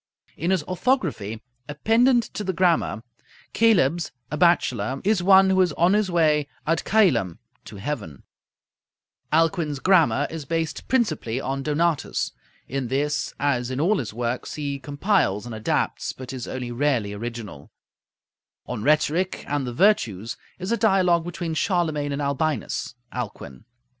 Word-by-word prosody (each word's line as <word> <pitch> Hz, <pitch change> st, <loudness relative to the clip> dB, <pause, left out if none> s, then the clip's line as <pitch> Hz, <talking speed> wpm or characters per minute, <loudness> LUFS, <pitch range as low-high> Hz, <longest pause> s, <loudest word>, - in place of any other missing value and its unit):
In 170 Hz, -, -2 dB
his 190 Hz, -5 st, +2 dB
'Orthography,' 170 Hz, -, -1 dB, 0.3 s
a 145 Hz, -, -5 dB
pendant 235 Hz, -, +3 dB
to 210 Hz, -, -4 dB
the 190 Hz, -1 st, -2 dB
'Grammar,' 170 Hz, -, +1 dB, 0.5 s
coelebs, 175 Hz, -8 st, +3 dB, 0.2 s
a -, -, -1 dB
bachelor, 135 Hz, -, +2 dB
is 205 Hz, -2 st, +2 dB
"one 190 Hz, +1 st, +6 dB
who 190 Hz, 0 st, +4 dB
is 180 Hz, -4 st, +2 dB
on 175 Hz, +5 st, +3 dB
his 210 Hz, -2 st, +2 dB
way 155 Hz, -4 st, +2 dB, 0.2 s
ad 165 Hz, +1 st, +1 dB
coelum" 130 Hz, -, +3 dB, 0.3 s
(to 110 Hz, -, -10 dB
heaven). 100 Hz, -, -5 dB, 1.1 s
Alcuin's 160 Hz, -2 st, +1 dB
'Grammar' 145 Hz, -5 st, +3 dB
is 160 Hz, -2 st, -5 dB
based 165 Hz, +2 st, -3 dB
principally 155 Hz, -, 0 dB
on 135 Hz, +1 st, -3 dB
Donatus. 155 Hz, +2 st, 0 dB, 0.4 s
In 135 Hz, -1 st, -3 dB
this, 145 Hz, +3 st, -1 dB
as 125 Hz, -4 st, 0 dB
in 130 Hz, +1 st, -3 dB
all 190 Hz, +7 st, +2 dB
his 120 Hz, -, -4 dB
works, 120 Hz, +2 st, -3 dB
he 140 Hz, -2 st, -3 dB
compiles 145 Hz, -, 0 dB
and 120 Hz, -, -7 dB
adapts, 110 Hz, 0 st, -1 dB
but 130 Hz, 0 st, -8 dB
is 125 Hz, -2 st, -6 dB
only 125 Hz, -2 st, -5 dB
rarely 120 Hz, -5 st, 0 dB
original. 110 Hz, -8 st, -7 dB, 1.0 s
'On 125 Hz, -4 st, -5 dB
Rhetoric 155 Hz, -, +1 dB
and 140 Hz, -2 st, -1 dB
the -, -, -3 dB
Virtues' 115 Hz, -, +1 dB, 0.2 s
is 185 Hz, +4 st, -4 dB
a 235 Hz, -, +2 dB
dialogue 185 Hz, -6 st, +3 dB
between 175 Hz, -2 st, -4 dB
Charlemagne 160 Hz, -4 st, 0 dB
and 140 Hz, +1 st, -2 dB
Albinus 140 Hz, -2 st, -2 dB, 0.2 s
(Alcuin). 100 Hz, -, -7 dB
150 Hz, 145 wpm, -24 LUFS, 125-180 Hz, 1.1 s, one